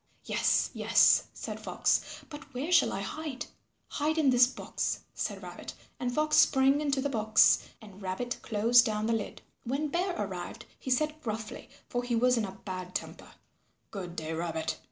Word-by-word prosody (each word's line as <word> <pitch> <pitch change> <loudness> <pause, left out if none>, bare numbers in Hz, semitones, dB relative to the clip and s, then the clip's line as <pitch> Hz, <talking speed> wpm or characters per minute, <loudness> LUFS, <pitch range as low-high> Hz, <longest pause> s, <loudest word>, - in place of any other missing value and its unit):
"Yes, - - +2
yes," - - +5
said - - -7
Fox, - - -1
"but 295 -3 -11
where 285 +8 -3
shall 340 - +5
I 195 - -3
hide?" 280 +6 -5 0.4
"Hide 310 +2 -1
in 290 -4 +4
this 245 0 +6
box," - - -3
said - - -4
Rabbit, - - -8 0.2
and 245 -1 -1
Fox 305 +4 +1
sprang 270 +2 +5
into 280 -2 0
the 285 - 0
box, 220 -3 +4 0.2
and 205 -2 -13
Rabbit 195 +6 -3
closed 235 +2 +4
down 215 -1 -1
the 230 - +1
lid. 220 -2 -4 0.2
When 280 +5 -2
Bear 360 +3 -1
arrived - - -5
he - - -6
said 305 +4 0
gruffly, 220 -4 -5 0.2
for 245 - -2
he 245 -1 -1
was 250 +2 +4
in 225 -3 0
a 190 - -7
bad 185 -2 -6
temper, - - -6 0.6
"Good 180 -4 -6
day, 160 -1 -4
Rabbit. 160 -1 -3
245 Hz, 175 wpm, -30 LUFS, 210-285 Hz, 0.6 s, this